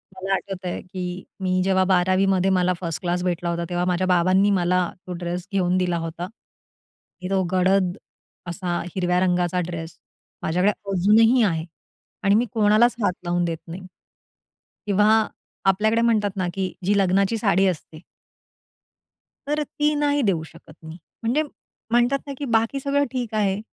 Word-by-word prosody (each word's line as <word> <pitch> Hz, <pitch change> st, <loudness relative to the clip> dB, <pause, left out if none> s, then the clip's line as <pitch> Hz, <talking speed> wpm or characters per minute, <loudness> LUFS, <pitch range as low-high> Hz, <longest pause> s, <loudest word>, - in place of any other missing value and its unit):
मला 190 Hz, +1 st, -2 dB
आठवतंय, 185 Hz, -2 st, -5 dB
की 180 Hz, -1 st, -6 dB, 0.2 s
मी 185 Hz, -1 st, +1 dB
जेव्हा 190 Hz, 0 st, +3 dB
12वीमध्ये 185 Hz, +1 st, +2 dB
मला 180 Hz, -1 st, +2 dB
फर्स्ट 165 Hz, -4 st, -4 dB
क्लास 180 Hz, 0 st, -1 dB
भेटला 175 Hz, -1 st, -1 dB
होता, 170 Hz, 0 st, -2 dB
तेव्हा 175 Hz, 0 st, -1 dB
माझ्या 180 Hz, +1 st, 0 dB
बाबांनी 185 Hz, +2 st, +3 dB
मला 180 Hz, -2 st, +1 dB, 0.2 s
तो 180 Hz, -, -4 dB
ड्रेस 175 Hz, 0 st, -4 dB
घेऊन 185 Hz, -2 st, +2 dB
दिला 180 Hz, -2 st, 0 dB
होता, 165 Hz, +1 st, -5 dB
की 185 Hz, -3 st, -16 dB
तो 195 Hz, -1 st, +2 dB
गडद 185 Hz, 0 st, +2 dB, 0.5 s
असा 175 Hz, 0 st, -2 dB, 0.2 s
हिरव्या 180 Hz, -1 st, +1 dB
रंगाचा 180 Hz, -1 st, +1 dB
ड्रेस 165 Hz, -1 st, -6 dB, 0.5 s
माझ्याकडे 180 Hz, +5 st, +2 dB, 0.2 s
अजूनही 220 Hz, +6 st, +4 dB
आहे 165 Hz, -6 st, 0 dB, 0.6 s
आणि 200 Hz, 0 st, +4 dB
मी 235 Hz, +3 st, +3 dB
कोणालाच 220 Hz, +2 st, +4 dB
हात 185 Hz, -, +2 dB
लावून 175 Hz, 0 st, 0 dB
देत 165 Hz, -1 st, -2 dB
नाही 170 Hz, +3 st, -7 dB, 1.1 s
किंवा 205 Hz, 0 st, +3 dB, 0.6 s
आपल्याकडे 215 Hz, +4 st, +2 dB
म्हणतात 220 Hz, -3 st, +2 dB
ना, 185 Hz, -2 st, 0 dB
की 190 Hz, -1 st, -3 dB
जी 200 Hz, +2 st, +2 dB
लग्नाची 195 Hz, +3 st, +2 dB
साडी 195 Hz, -3 st, +2 dB
असते 160 Hz, -3 st, -4 dB, 1.5 s
तर 300 Hz, +1 st, 0 dB
ती 295 Hz, +1 st, 0 dB
नाही 290 Hz, 0 st, +1 dB
देऊ 185 Hz, -7 st, +1 dB
शकत 160 Hz, -, -15 dB
मी. 160 Hz, +1 st, -9 dB, 0.3 s
म्हणजे 250 Hz, +7 st, +1 dB, 0.5 s
म्हणतात 240 Hz, +3 st, +3 dB
ना, 280 Hz, -, -4 dB
की 285 Hz, -, -4 dB
बाकी 230 Hz, +2 st, +1 dB
सगळं 280 Hz, +1 st, +1 dB
ठीक 245 Hz, -4 st, -4 dB
आहे 200 Hz, -2 st, +1 dB
185 Hz, 150 wpm, -23 LUFS, 180-210 Hz, 1.5 s, अजूनही